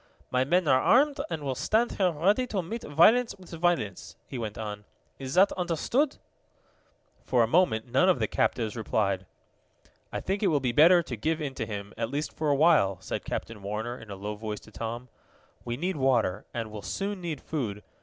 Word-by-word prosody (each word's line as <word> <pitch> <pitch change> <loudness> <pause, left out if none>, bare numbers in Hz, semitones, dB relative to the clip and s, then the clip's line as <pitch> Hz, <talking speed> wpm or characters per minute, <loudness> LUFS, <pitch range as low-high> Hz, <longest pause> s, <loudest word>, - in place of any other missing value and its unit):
"My 125 0 +2
men 175 +5 +2
are 130 -1 +5
armed, 280 - +4
and 160 -3 -4
will 135 -2 -1
stand 220 - +1
here 190 -2 +2
ready 195 +10 +1
to 195 -6 -2
meet 225 +7 -5
violence 220 +11 +4
with 185 -2 -15
violence," 165 - -1
he 130 - -6
went 110 -2 -5
on. 105 -2 -5 0.4
"Is 135 +1 -5
that 190 +2 +6
understood?" 190 - 0 1.1
For 120 -2 +3
a - - +1
moment 115 -7 +2
none 130 +9 +3
of 185 - +4
the 110 -3 0
captives 110 0 0
replied. 100 -4 -1 0.8
"I - - -3
think 195 +2 -2
it 205 - +3
will 155 -5 +3
be 130 -2 0
better 170 +7 +6
to 125 - -5
give 155 +9 -1
in 145 -3 -3
to 110 -4 -4
him 100 -1 -6
at 115 -1 -1
least 145 +3 -3
for 155 -1 -1
a 145 - +4
while," 145 - +4
said 95 - -5
Captain 110 -2 -5
Warner 110 +4 -4
in 115 - -12
a 100 - -6
low 105 +2 -5
voice 105 0 -5
to 110 - -16
Tom. 115 +3 -5 0.6
"We 120 0 -4
need 180 +3 -2
water, 120 -8 +1
and 115 -3 -4
will 105 -1 -7
soon 195 - -3
need 165 -5 -4
food. 110 -11 -4
135 Hz, 205 wpm, -28 LUFS, 110-175 Hz, 1.1 s, that